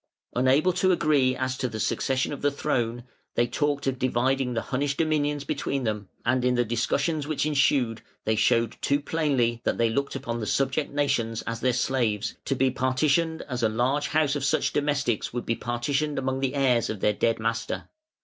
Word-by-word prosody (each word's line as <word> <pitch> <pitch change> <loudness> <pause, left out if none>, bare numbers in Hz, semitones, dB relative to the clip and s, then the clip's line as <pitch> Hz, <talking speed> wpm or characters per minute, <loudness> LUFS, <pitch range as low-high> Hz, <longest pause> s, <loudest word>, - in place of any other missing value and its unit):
Unable 135 +8 +3
to 185 +1 +2
agree 145 -7 +3
as 130 0 -2
to 125 - -1
the 110 -1 -6
succession 130 +6 0
of 140 - -7
the 145 - +3
throne, 120 -5 -1 0.3
they 120 - +3
talked 145 +3 -1
of 130 -2 -1
dividing 130 0 +1
the 115 - -1
Hunnish 140 +2 -1
dominions 150 -2 0
between 140 -1 -2
them, 105 -3 -3 0.2
and 125 +1 +2
in 125 0 +2
the 120 0 +2
discussions 140 +6 0
which 155 -1 0
ensued 140 -6 +2 0.2
they 110 - +2
showed 115 +1 +2
too 140 +1 +2
plainly 140 -7 0
that - - 0
they 115 -1 +2
looked 140 +4 -1
upon 120 0 -3
the 110 - -4
subject 135 +2 0
nations 120 -6 0
as 115 0 -4
their 130 +2 +2
slaves, 120 -4 0
to 135 - 0
be 130 0 +2
partitioned 140 +5 +1
as 125 -3 -4
a 110 - +3
large 125 +6 0
household 150 -2 +1
of - - -1
such - - +1
domestics 140 -7 0
would 120 - -3
be 115 - +1
partitioned 135 +6 -1
among 130 0 -1
the 135 0 -1
heirs 125 -4 +2
of 110 - -4
their 105 - +3
dead 115 +2 +1
master. 115 +1 -2
130 Hz, 195 wpm, -26 LUFS, 120-145 Hz, 0.3 s, Unable